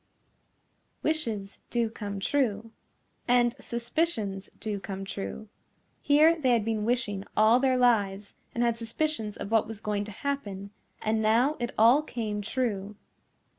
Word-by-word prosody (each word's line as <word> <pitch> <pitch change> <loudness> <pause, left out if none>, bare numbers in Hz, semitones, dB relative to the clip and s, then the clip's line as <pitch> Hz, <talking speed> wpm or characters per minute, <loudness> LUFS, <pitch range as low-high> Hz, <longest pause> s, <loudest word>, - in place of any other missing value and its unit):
Wishes 225 -11 -2
do 235 -1 +1
come 205 -3 -5
true. 225 -2 0 0.6
And 240 -1 +4
suspicions 235 - -2
do 210 -2 -3
come 195 0 -6
true. 145 - -6 0.5
Here 305 +3 +5
they 255 -3 +4
had 225 -3 +2
been 220 -2 -1
wishing 220 -5 0
all 220 +3 +6
their 260 -1 +2
lives, 205 -5 +2 0.2
and 235 - +1
had 235 -1 +1
suspicions 230 -2 -2
of 200 - -6
what 225 -2 +3
was 220 -1 -6
going 210 -1 -2
to 210 - -8
happen, 200 -6 -4 0.3
and 220 0 +1
now 235 +7 +3
it 240 0 -2
all 235 +7 +6
came 220 -8 -3
true. 210 -3 -2
225 Hz, 140 wpm, -28 LUFS, 205-245 Hz, 0.6 s, all